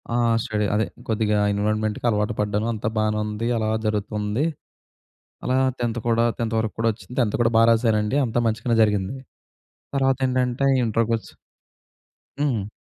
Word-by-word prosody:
ఆహ్, 120 Hz, -1 st, +3 dB
స్టడీ 105 Hz, -1 st, -1 dB
అదే 110 Hz, +1 st, +2 dB, 0.2 s
కొద్దిగా 105 Hz, -1 st, +1 dB
ఎన్విరాన్మెంట్‌కి 105 Hz, +2 st, -1 dB
అలవాటు 105 Hz, +1 st, 0 dB
పడ్డాను. 105 Hz, +2 st, -1 dB
అంతా 110 Hz, 0 st, -2 dB
బానే 105 Hz, 0 st, +1 dB
ఉంది. 105 Hz, +2 st, -3 dB
అలా 110 Hz, -1 st, 0 dB, 0.2 s
జరుగుతుంది. 105 Hz, +4 st, -1 dB, 1.0 s
అలా 130 Hz, -, +1 dB, 0.2 s
10థ్ 120 Hz, -1 st, -1 dB
కూడా 115 Hz, 0 st, +3 dB
10థ్ 115 Hz, -1 st, -2 dB
వరకు 110 Hz, -1 st, -2 dB
కూడొచ్చింది 115 Hz, +2 st, -2 dB
10థ్ 105 Hz, -4 st, 0 dB
కూడా 115 Hz, -1 st, +3 dB
బాగా 115 Hz, 0 st, +6 dB
రాసానండి. 110 Hz, +1 st, +2 dB
అంతా 120 Hz, 0 st, -1 dB
మంచిగానే 115 Hz, +1 st, 0 dB
జరిగింది. 105 Hz, +1 st, 0 dB, 0.8 s
తర్వాత 135 Hz, -1 st, +2 dB
ఏంటంటే 125 Hz, +1 st, 0 dB, 0.2 s
ఇంటర్‌కొచ్చ 115 Hz, 0 st, 0 dB, 1.1 s
హ్మ్. 120 Hz, -9 st, 0 dB
110 Hz, 135 wpm, -23 LUFS, 105-115 Hz, 1.1 s, బాగా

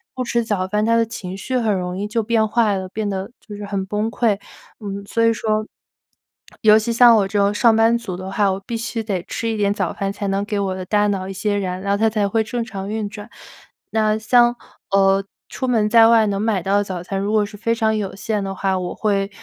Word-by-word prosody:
不 255 Hz, -, -2 dB
吃 235 Hz, -1 st, 0 dB
早 205 Hz, -4 st, -1 dB
饭， 210 Hz, +2 st, 0 dB
他 230 Hz, +1 st, +3 dB
的 230 Hz, 0 st, +3 dB
情 190 Hz, -4 st, -7 dB
绪 255 Hz, +6 st, -2 dB
很 220 Hz, -4 st, +1 dB
容 180 Hz, 0 st, -3 dB
易 205 Hz, +2 st, -3 dB
就 225 Hz, +1 st, -1 dB
变 220 Hz, 0 st, +2 dB
坏 215 Hz, -2 st, +2 dB
了， 190 Hz, 0 st, -5 dB
变 215 Hz, +2 st, -3 dB
得 190 Hz, 0 st, -4 dB
就 210 Hz, -, -10 dB
是 205 Hz, -, -8 dB
很 200 Hz, -1 st, -3 dB
崩 210 Hz, +3 st, -2 dB
溃。 230 Hz, -2 st, +1 dB, 0.4 s
嗯， 200 Hz, -2 st, -6 dB
所 230 Hz, +3 st, 0 dB
以 230 Hz, -, +5 dB
说， 215 Hz, -1 st, -1 dB, 1.0 s
尤 215 Hz, 0 st, +6 dB
其 220 Hz, +2 st, -2 dB
像 235 Hz, 0 st, +7 dB
我 205 Hz, -3 st, +2 dB
这 205 Hz, +1 st, -3 dB
种 200 Hz, 0 st, +3 dB
上 225 Hz, +1 st, +4 dB
班 225 Hz, +1 st, +4 dB
族 205 Hz, -7 st, -6 dB
的 185 Hz, +1 st, -6 dB
话， 200 Hz, 0 st, +2 dB
我 190 Hz, -, -3 dB
必 235 Hz, -, -4 dB
须 230 Hz, 0 st, -3 dB
得 200 Hz, -5 st, -2 dB
吃 230 Hz, -, -4 dB
一 225 Hz, -, -1 dB
点 200 Hz, -1 st, +1 dB
早 190 Hz, -4 st, -2 dB
饭， 195 Hz, 0 st, -2 dB
才 200 Hz, 0 st, -4 dB
能 195 Hz, +1 st, 0 dB
给 205 Hz, 0 st, -2 dB
我 195 Hz, -2 st, -1 dB
的 185 Hz, -, -5 dB
大 210 Hz, +2 st, +2 dB
脑 190 Hz, -2 st, -2 dB
一 -, -, -5 dB
些 205 Hz, +2 st, -1 dB
燃 185 Hz, -2 st, -3 dB
料， 200 Hz, +1 st, 0 dB
它 220 Hz, +2 st, +2 dB
才 210 Hz, -2 st, 0 dB
会 220 Hz, +3 st, +1 dB
正 235 Hz, +2 st, -3 dB
常 195 Hz, -3 st, -6 dB
运 215 Hz, -1 st, -2 dB
转。 205 Hz, +2 st, -10 dB, 0.6 s
那 215 Hz, -1 st, +2 dB
像， 240 Hz, +2 st, +4 dB, 0.4 s
呃， 195 Hz, 0 st, +3 dB, 0.3 s
出 260 Hz, -, -4 dB
门 225 Hz, -4 st, +2 dB
在 225 Hz, 0 st, +7 dB
外 225 Hz, -1 st, +5 dB
能 200 Hz, -1 st, -1 dB
买 215 Hz, -4 st, 0 dB
到 195 Hz, +2 st, +2 dB
的 205 Hz, -, +2 dB
早 185 Hz, -3 st, -5 dB
餐， 195 Hz, +2 st, -3 dB
如 200 Hz, +2 st, -2 dB
果 215 Hz, -1 st, +3 dB
是 205 Hz, -, -11 dB
非 230 Hz, +2 st, 0 dB
常 220 Hz, -1 st, +1 dB
有 205 Hz, -3 st, -3 dB
限 210 Hz, 0 st, -2 dB
的 195 Hz, 0 st, -4 dB
话， 190 Hz, 0 st, 0 dB
我 180 Hz, -1 st, -4 dB
会， 200 Hz, -2 st, 0 dB
210 Hz, 270 characters per minute, -20 LUFS, 195-225 Hz, 1.0 s, 像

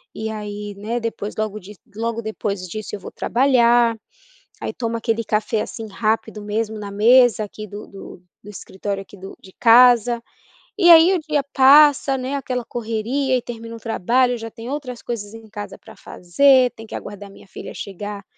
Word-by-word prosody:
e 220 Hz, 0 st, -4 dB
aí, 210 Hz, -1 st, -6 dB
né, 220 Hz, +4 st, -3 dB
depois 225 Hz, -2 st, -5 dB
logo 215 Hz, -1 st, -3 dB
di 205 Hz, +2 st, -13 dB, 0.2 s
logo 230 Hz, +1 st, -3 dB
depois 205 Hz, -3 st, -4 dB
disso 215 Hz, +3 st, -6 dB
eu -, -, -9 dB
vou -, -, -9 dB
trabalhar. 240 Hz, -2 st, +3 dB, 0.6 s
Aí -, -, -4 dB
tomo 230 Hz, -1 st, -3 dB
aquele 230 Hz, 0 st, -1 dB
café 215 Hz, 0 st, -1 dB
assim 225 Hz, -, -7 dB
rápido 215 Hz, 0 st, -2 dB
mesmo 215 Hz, +1 st, -3 dB
na 205 Hz, -1 st, -7 dB
mesa 230 Hz, +2 st, +4 dB
aqui 215 Hz, +1 st, -9 dB
do 205 Hz, +2 st, -9 dB
do 195 Hz, -2 st, -12 dB, 0.2 s
do 210 Hz, -, -10 dB
escritório 195 Hz, 0 st, -6 dB
aqui 200 Hz, -, -16 dB
do 195 Hz, +1 st, -10 dB
de 190 Hz, -, -16 dB
casa, 240 Hz, 0 st, +5 dB, 0.6 s
e 350 Hz, -, +4 dB
aí 335 Hz, +2 st, +8 dB
o -, -, +1 dB
dia 300 Hz, -2 st, -1 dB
passa, 275 Hz, 0 st, +6 dB
né, 260 Hz, +2 st, -3 dB
aquela 250 Hz, -3 st, -3 dB
correria 240 Hz, +4 st, -2 dB
e 250 Hz, -, -2 dB
termina 230 Hz, -1 st, -8 dB
um -, -, -10 dB
trabalho, 240 Hz, +3 st, +1 dB
eu -, -, -5 dB
já 225 Hz, 0 st, -7 dB
tenho 230 Hz, +2 st, -9 dB
outras 255 Hz, -5 st, -6 dB
coisas 215 Hz, -3 st, -6 dB
em 225 Hz, -1 st, -12 dB
casa 205 Hz, 0 st, -8 dB
pra -, -, -15 dB
fazer, 255 Hz, +8 st, +3 dB
tenho 225 Hz, -, -11 dB
que -, -, -9 dB
aguardar 205 Hz, 0 st, -8 dB
a -, -, -16 dB
minha 195 Hz, -, -17 dB
filha -, -, -9 dB
chegar 200 Hz, +1 st, -7 dB
225 Hz, 190 wpm, -20 LUFS, 210-245 Hz, 0.6 s, aí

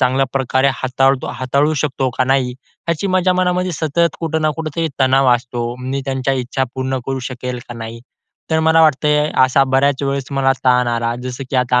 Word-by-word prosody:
चांगल्या 130 Hz, +1 st, +2 dB
प्रकारे 135 Hz, 0 st, +1 dB
हाताळतो 135 Hz, +1 st, +1 dB
हाताळू 140 Hz, +4 st, +1 dB
शकतो 135 Hz, -2 st, -1 dB
का 130 Hz, -, +3 dB
नाही? 130 Hz, -1 st, +1 dB, 0.4 s
याची 170 Hz, +4 st, 0 dB
माझ्या 185 Hz, 0 st, +2 dB
मनामध्ये 180 Hz, 0 st, 0 dB
सतत 165 Hz, +2 st, 0 dB
कुठं 160 Hz, -1 st, -1 dB
ना 155 Hz, -, +2 dB
कुठेतरी 160 Hz, +1 st, -2 dB
तणाव 130 Hz, 0 st, +4 dB
असतो. 120 Hz, 0 st, -4 dB, 0.2 s
मी 130 Hz, +2 st, -3 dB
त्यांच्या 135 Hz, 0 st, 0 dB
इच्छा 130 Hz, +1 st, -1 dB
पूर्ण 130 Hz, 0 st, -2 dB
करू 135 Hz, 0 st, -2 dB
शकेल 125 Hz, 0 st, -5 dB
का 120 Hz, -, -7 dB
नाही? 115 Hz, 0 st, -7 dB, 0.5 s
तर 160 Hz, 0 st, +2 dB
मला 160 Hz, +1 st, +4 dB
वाटतंय 150 Hz, 0 st, +3 dB
असा 130 Hz, +1 st, +3 dB
बऱ्याच 135 Hz, +1 st, +1 dB
वेळेस 140 Hz, -1 st, -1 dB
मला 135 Hz, -1 st, +2 dB
ताण 125 Hz, -1 st, +3 dB
आला 115 Hz, 0 st, -1 dB
जसं, 130 Hz, +1 st, -5 dB
की 135 Hz, -, 0 dB
आता 125 Hz, 0 st, +2 dB
135 Hz, 185 wpm, -18 LUFS, 130-150 Hz, 0.5 s, तणाव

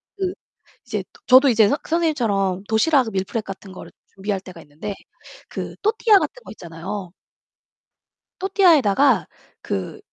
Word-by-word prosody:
그 375 Hz, -2 st, -2 dB, 0.5 s
이제 -, -, -3 dB
도 460 Hz, -, -20 dB
저도 260 Hz, +2 st, +7 dB
이제 225 Hz, -3 st, +5 dB
선 285 Hz, -, +1 dB
선생님처럼 225 Hz, -, 0 dB
도시락 245 Hz, +2 st, +2 dB
밀프렙 195 Hz, +3 st, -2 dB
같은 195 Hz, -1 st, -9 dB
거를 185 Hz, -, -11 dB, 0.2 s
준비할 195 Hz, 0 st, -3 dB
때가 185 Hz, -3 st, -12 dB
있는데 155 Hz, +8 st, -7 dB, 0.6 s
그 -, -, -6 dB
또르띠아 435 Hz, -1 st, +4 dB
같은 -, -, -5 dB
거 -, -, -11 dB
있잖아요. 175 Hz, +1 st, -7 dB, 1.3 s
또르띠아에다가 290 Hz, -, +4 dB, 0.3 s
그 95 Hz, -1 st, -4 dB
220 Hz, 310 characters per minute, -22 LUFS, 190-320 Hz, 1.3 s, 저도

